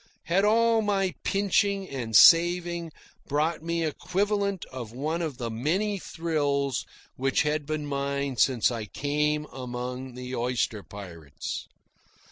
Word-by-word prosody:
Had 180 +4 +2
all 225 +1 +4
my 195 -3 +1
pinching 200 0 +1
and 120 -7 -4
saving 170 +2 +6 0.4
brought 155 +3 0
me 170 +1 -1
the 160 - +1
equivalent 200 +3 -1
of 120 -4 -6
one 155 +7 -2
of 155 -6 -3
the 120 -3 -3
many 185 - 0
thrills 145 -6 -1 0.3
which 135 +4 +2
had 150 -1 -1
been 155 -1 -2
mine 140 -1 -2
since 125 -2 +3
I 115 -3 -3
came 150 +5 -1
among 125 0 -5
the 125 0 -5
oyster 120 -3 -1
pirates? 85 -8 -7
150 Hz, 130 wpm, -27 LUFS, 125-175 Hz, 0.4 s, saving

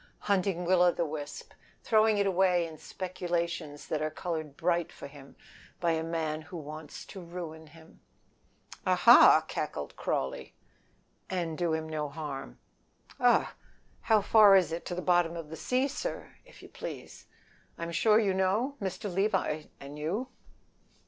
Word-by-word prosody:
"Hunting 190 -3 0
Will 180 0 +4
o' 180 0 +6
the 170 - -1
wisp. 150 -1 -7 0.3
Throwing 220 -1 +4
it 200 - +2
away 185 -2 +3
in 160 -2 -10
speculations 170 -4 -4
that 155 - -1
are 155 - 0
colored 155 -3 -5
bright 175 0 0
for - - -10
him 140 -1 -13 0.4
by 170 -1 +1
a 160 -1 0
man 160 -2 -2
that 160 - -15
wants 155 -2 -8
to 190 - -10
ruin 170 -2 -8
him." 160 +1 -18 0.8
"Aha!" - - +7
cackled - - -4
Crawley. 65 - -3 0.7
"And 170 -4 -2
do 170 -1 0
him 160 0 -4
no 155 -2 -3
harm." 140 - -7 0.6
"Augh! - - +4 0.5
How 220 -2 +3
far 205 -1 +7
is 185 -4 +3
it 165 +1 -5
to 175 - -3
the 180 - -4
bottom 175 -2 +2
of 160 -2 -8
the - - -5
sea, 250 - 0
sir, 400 - -5
if - - -17
you - - -12
please? - - -9 0.5
I'm 170 0 -4
sure 210 +6 +4
you 205 -4 +2
know? 205 +9 0
Mr. 190 +1 -3
Levi 190 -6 0
and 140 +2 -9
you." 200 +12 -2
170 Hz, 155 wpm, -30 LUFS, 155-190 Hz, 0.8 s, Aha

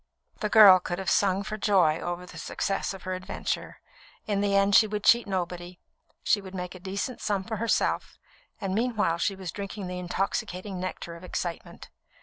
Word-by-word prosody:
The 210 - -1
girl 205 -4 +9
could 175 0 -4
have 190 -2 -1
sung 195 0 +2
for 215 +1 -5
joy 185 -7 +3
over 175 +1 -4
the - - -10
success 195 - -2
of 195 -2 -9
her 185 - -3
adventure. 185 0 -4 0.4
In 205 -2 0
the 200 -1 +1
end 195 +1 +3
she 215 - +7
would 210 -1 -4
cheat 235 -1 +5
nobody; 180 -1 -4 0.4
she 205 - +2
would 190 -1 -10
make 180 -1 -5
a 185 - -10
decent 200 +7 -4
sum 205 -3 -1
for 220 +3 -4
herself, 230 +1 0 0.4
and 195 -1 -2
meanwhile 215 -7 0
she 195 - 0
was 190 -3 -6
drinking 200 +1 -6
the 180 0 -5
intoxicating 185 +1 -3
nectar 180 -2 -5
of 170 - -12
excitement. 175 -1 -5
195 Hz, 185 wpm, -27 LUFS, 180-205 Hz, 0.4 s, girl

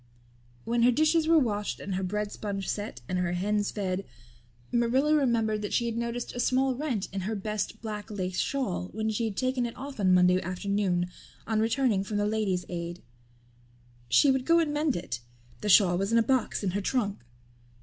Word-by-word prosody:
When 235 +1 +1
her 240 - +6
dishes 310 +5 +3
were 330 0 +6
washed 210 -7 0
and 195 - -5
her 185 - -1
bread 205 +2 -2
sponge 200 -2 -4
set 205 - -4
and 180 - -1
her 175 -1 0
hens 205 +3 0
fed 195 -2 -2 0.7
Marilla 250 +5 +2
remembered 230 -7 +2
that 205 - -4
she 235 - +2
had 230 -1 -2
noticed 235 +1 -3
a 245 - -5
small 260 +2 +2
rent 255 -7 -2
in 195 - -2
her 215 +4 -2
best 210 +2 -3
black 210 0 -5
lace 185 -3 -3
shawl 230 -10 -1
when 220 0 -1
she 225 +2 -1
had 215 -3 -4
taken 255 -1 0
it 230 - -9
off 275 -2 -7
on 190 -2 +3
Monday 180 0 +5
afternoon 185 -1 -1 0.4
on 220 -1 0
returning 225 -3 +2
from 205 +1 -3
the 205 - +1
Ladies' 205 -4 0
Aid. 170 0 -5 1.1
She 280 - +5
would 265 -1 0
go 335 0 +5
and 320 -3 +1
mend 295 -2 +1
it. 125 -9 -4 0.4
The 210 - -3
shawl 180 -3 +6
was 195 +2 -1
in 230 - +4
a 230 - +5
box 255 -3 0
in 190 - 0
her 200 +3 -1
trunk. 205 -2 -1
215 Hz, 200 wpm, -28 LUFS, 195-245 Hz, 1.1 s, her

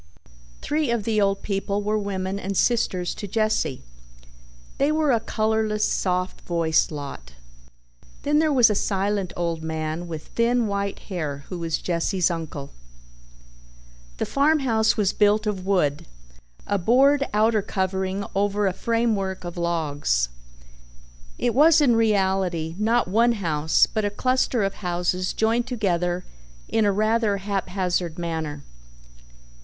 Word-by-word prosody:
Three 300 -2 0
of 235 -3 0
the 215 0 +1
old 195 0 +1
people 200 0 -2
were 210 +1 0
women 195 -1 -3
and 195 0 -3
sisters 185 -7 +1
to 205 - -7
Jesse. 215 - 0 1.0
They 280 +2 +3
were 310 -2 +2
a 235 - +3
colorless, 215 -1 0
soft 185 0 -1
voiced 165 -2 +1
lot. 140 - -7 0.9
Then 295 +1 +2
there 315 -1 +2
was 245 -6 +5
a - - +2
silent 200 -1 -1
old 170 -2 -2
man 160 +1 -3
with 160 -2 -7
thin 235 +1 +1
white 200 -1 -2 0.2
hair 145 -5 -4
who 180 - -5
was 165 -1 -1
Jesse's 175 +1 0
uncle. 155 -4 -6 1.5
The - - -1
farmhouse 270 -7 +2
was 205 -3 +1
built 210 +1 +3
of 195 -3 -3
wood, 170 -5 +1 0.6
a 200 - 0
board 275 +8 +4
outer 215 +1 +3
covering 190 0 -2
over 205 +1 +1
a 190 - +1
framework 215 -3 -1
of 175 -1 -6
logs. 150 - 0 1.1
It 240 - 0
was 310 +5 +6
in 260 -6 +4
reality 190 -7 +1
not 230 +1 +2
one 230 +5 +3
house 160 -7 +2
but 215 - -3
a 205 - +1
cluster 255 +1 0
of 195 0 -1
houses 180 0 -1
joined 230 +2 +1
together 180 -6 -1 0.4
in 225 -1 +1
a 205 - +3
rather 215 0 +1
haphazard 185 -3 -2
manner. 160 -4 -4
200 Hz, 135 wpm, -24 LUFS, 175-220 Hz, 1.5 s, was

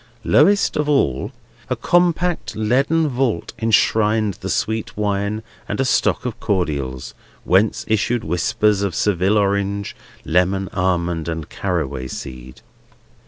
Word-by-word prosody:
Lowest 200 +1 +3
of 150 0 0
all, 70 - +1 0.4
a - - +1
compact 175 0 +1
leaden 135 +9 +2
vault 125 - -1
enshrined 110 -1 +2
the 95 - -4
sweet 110 +1 -2
wine 105 +1 -1 0.3
and - - -3
a 135 - +2
stock 130 - +1
of 120 -2 -4
cordials: 70 - -2 0.3
whence 95 +4 +2
issued 110 +2 0
whispers 95 +5 +1
of 100 -4 -1
Seville 100 +1 +2
Orange, 100 0 0 0.3
Lemon, 95 +3 +1
Almond, 85 -3 0
and 80 -2 -4
Caraway 70 -9 -3
seed. 65 -1 -8
100 Hz, 120 wpm, -20 LUFS, 90-115 Hz, 0.4 s, Lowest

